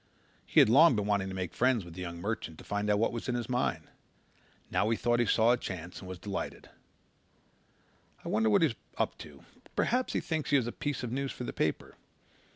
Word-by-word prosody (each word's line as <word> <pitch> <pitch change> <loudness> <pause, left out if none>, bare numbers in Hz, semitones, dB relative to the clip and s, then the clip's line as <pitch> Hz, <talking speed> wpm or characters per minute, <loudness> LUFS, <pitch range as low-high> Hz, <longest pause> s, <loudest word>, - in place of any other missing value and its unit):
He - - +4
had - - +6
long 145 +6 +7
been 105 -1 0
wanting 100 -2 0
to 95 - -6
make 95 -2 -4
friends 125 -6 +2
with 85 - -10
the 90 - -7
young 85 -1 -5
merchant 95 -5 -4
and - - -12
find 105 +1 -2
out 105 - +4
what 115 - +2
was 120 +1 -5
in 120 - 0
his 120 -2 -2
mind. 125 0 -1 0.8
Now 95 +4 +2
he 115 - +1
thought 120 0 +1
he 120 - +2
saw 115 +3 +4
a 125 - +3
chance 90 -6 -6
and 95 - -10
was 95 - -6
delighted. 100 +2 -5 1.5
"I - - -5
wonder 110 +1 +2
what 105 - +4
he's 150 -7 +3 0.2
up - - 0
to? - - -11 0.3
Perhaps 250 +2 +1
he - - +1
thinks 160 -3 -3
he 145 - +4
has 130 -4 +3
a 120 - -3
piece 145 -1 -3
of 120 - -3
news 135 +1 -2
for - - -7
the - - -4
paper. - - -2
110 Hz, 230 wpm, -30 LUFS, 95-125 Hz, 1.5 s, long